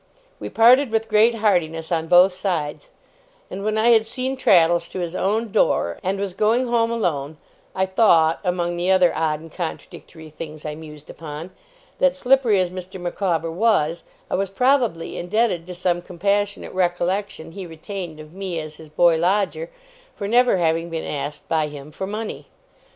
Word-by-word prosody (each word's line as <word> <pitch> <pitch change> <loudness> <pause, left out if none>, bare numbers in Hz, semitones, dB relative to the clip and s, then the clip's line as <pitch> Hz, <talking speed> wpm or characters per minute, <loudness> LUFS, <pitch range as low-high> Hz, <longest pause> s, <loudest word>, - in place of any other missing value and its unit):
We - - -6
parted 250 +4 +5
with 225 0 -1
great 225 +2 +4
heartiness 175 -6 0
on 165 -1 0
both 180 +2 +6
sides; 180 - -3 0.6
and 195 - -5
when 215 +1 0
I 225 +2 +3
had 225 -2 +6
seen 255 +3 -2
Traddles 170 -7 +3
to - - -6
his 175 0 -4
own 215 +4 -1
door, 85 - +1
and 195 +2 -2
was 200 -2 -3
going 220 +6 +2
home 235 -1 +1
alone, 160 -10 -2 0.4
I 190 - +1
thought, 175 -5 +3
among 175 -1 -1
the 175 +2 -1
other 185 -2 +4
odd 155 -1 -1
and 165 0 -12
contradictory 160 -2 -8
things 155 0 -9
I 150 - -3
mused 150 -1 -11
upon, 160 +2 -8 0.5
that, 275 -1 +3
slippery 255 -6 +3
as 180 -1 0
Mr. 185 +1 -8
Micawber 175 -2 -2
was, 170 -4 +1 0.3
I - - -6
was 195 0 0
probably 240 -5 +1
indebted 180 -2 0
to 180 - -7
some 175 -1 0
compassionate 200 +3 -2
recollection 180 0 -1
he 185 +1 -8
retained 165 0 -7
of 155 +1 -12
me 185 -3 -4
as 155 -1 -7
his 160 -1 -13
boy 165 +2 +3
lodger, 200 - 0 0.5
for 200 - -4
never 245 -1 +4
having 165 0 0
been 165 -1 -4
asked 145 +1 -5
by 155 -2 +1
him 145 0 -10
for 190 +5 -5
money. 215 +2 -5
180 Hz, 170 wpm, -22 LUFS, 165-210 Hz, 0.6 s, both